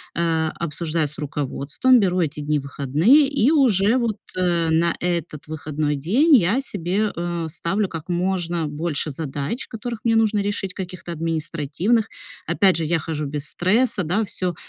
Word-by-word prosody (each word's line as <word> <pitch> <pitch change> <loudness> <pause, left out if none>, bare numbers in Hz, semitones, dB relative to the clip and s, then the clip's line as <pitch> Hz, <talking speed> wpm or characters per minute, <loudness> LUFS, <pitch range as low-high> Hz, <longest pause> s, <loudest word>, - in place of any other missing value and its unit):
э, 165 -1 +1
обсуждаю 165 -1 -1
с 150 - -7
руководством, 150 - +1
беру 185 -3 +1
эти 155 -3 -1
дни 150 0 0
в - - -9
выходные, 155 - +3
и 275 -1 +2
уже 235 - +3
вот, 230 -4 -1 0.2
э, 175 -2 +1
на 165 +1 +2
этот 170 -4 -3
выходной 150 -1 -2
день 235 - +4
я 210 +2 +3
себе, 200 -3 -1
э, 170 -1 -3
ставлю 175 +6 -1
как 165 -1 -8
можно 175 -2 -1
больше 150 0 -3
задач, 145 - -4
которых 235 0 -5
мне 225 -1 +3
нужно 220 -2 +2
решить, 200 -2 -3
каких-то 180 -2 -6
административных. 165 - -1 0.4
Опять 190 -2 +3
же, 165 - -1
я 165 +1 +1
хожу 155 -1 -4
без 145 +1 -4
стресса, 210 +3 +1
да, 190 +7 0
всё 180 -3 -3
170 Hz, 160 wpm, -22 LUFS, 155-205 Hz, 0.4 s, день